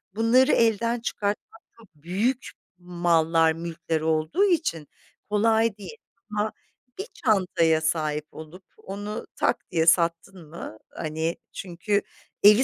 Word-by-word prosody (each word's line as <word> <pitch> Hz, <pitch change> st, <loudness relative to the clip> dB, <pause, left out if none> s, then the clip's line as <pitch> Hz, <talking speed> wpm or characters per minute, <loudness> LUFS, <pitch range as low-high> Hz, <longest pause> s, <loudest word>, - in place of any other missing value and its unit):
bunları 235 Hz, +4 st, +4 dB
elden 230 Hz, +1 st, +2 dB
çıkartmak, 210 Hz, 0 st, -4 dB, 0.2 s
çok 225 Hz, -3 st, -17 dB
büyük 200 Hz, -, -1 dB, 0.3 s
mallar, 165 Hz, -2 st, +2 dB
mülkler 165 Hz, -1 st, -3 dB
olduğu 160 Hz, -, +1 dB
için 310 Hz, -, 0 dB, 0.4 s
kolay 220 Hz, 0 st, +2 dB
değil. 205 Hz, +3 st, -9 dB, 0.3 s
Ama 210 Hz, +1 st, -1 dB, 0.5 s
bir 410 Hz, -, -4 dB, 0.2 s
çantaya 175 Hz, -6 st, +3 dB
sahip 155 Hz, -1 st, -1 dB
olup, 160 Hz, +4 st, -11 dB
onu 205 Hz, +2 st, -6 dB
tak -, -, -1 dB
diye 160 Hz, -1 st, +2 dB
sattın 170 Hz, 0 st, +1 dB
mı, 155 Hz, -9 st, -8 dB
hani, 160 Hz, +1 st, -3 dB, 0.2 s
çünkü 195 Hz, +3 st, -1 dB, 0.4 s
evi 210 Hz, +5 st, +8 dB
180 Hz, 115 wpm, -25 LUFS, 160-220 Hz, 0.5 s, evi